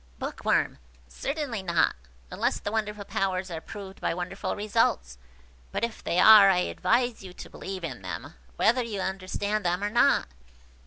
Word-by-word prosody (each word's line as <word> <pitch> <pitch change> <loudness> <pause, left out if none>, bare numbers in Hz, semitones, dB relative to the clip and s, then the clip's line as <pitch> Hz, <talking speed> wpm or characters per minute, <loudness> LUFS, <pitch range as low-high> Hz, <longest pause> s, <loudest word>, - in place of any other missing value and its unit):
Bookworm. - - -1 0.3
"Certainly 275 - -3
not, 170 -3 +2 0.4
unless - - 0
the 205 - -4
wonderful 210 -2 -2
powers 185 -1 -2
are 160 -1 -5
proved 195 +1 -10
by - - 0
wonderful 180 +2 -4
results; 200 - 0 0.5
but - - -3
if 235 -1 -3
they 170 - -1
are, 205 +1 +9
I 190 - +4
advise 240 +5 0
you 185 -2 -10
to - - -10
believe 190 -2 -7
in 130 -10 -5
them, 90 -3 -6 0.2
whether 240 - +3
you 215 -4 -4
understand 195 +3 -2
them 180 +2 0
or 205 - -1
not." 240 - +3
195 Hz, 160 wpm, -27 LUFS, 180-215 Hz, 0.5 s, are